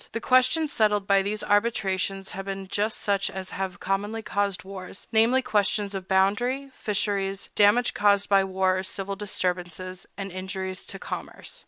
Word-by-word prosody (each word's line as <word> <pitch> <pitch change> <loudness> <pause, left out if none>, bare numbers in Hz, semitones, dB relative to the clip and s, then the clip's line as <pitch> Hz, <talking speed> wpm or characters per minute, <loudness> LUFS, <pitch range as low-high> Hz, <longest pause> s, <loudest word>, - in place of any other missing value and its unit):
The 230 - -1
questions 255 +6 +3
settled 210 -2 +2
by 195 -1 +4
these 210 +2 -3
arbitrations 195 -3 0
have 195 0 -6
been 195 -1 -5
just 210 +3 -1
such 200 -1 0
as 190 -1 -6
have 190 -1 -4
commonly 205 +3 -2
caused 200 -3 -1
wars, 190 0 -8
namely, 230 +4 +4
questions 205 -3 +1
of 190 -1 -5
boundary, 240 +9 +1
fisheries, 200 -3 -1
damage 210 +4 +4
caused 205 -1 +3
by 195 -1 +5
war 190 0 +1
or - - -3
civil 195 +1 -4
disturbances, 185 -2 -3
and 195 -1 -5
injuries 190 0 -5
to 195 - -5
commerce. - - -7
195 Hz, 160 wpm, -26 LUFS, 190-210 Hz, -, by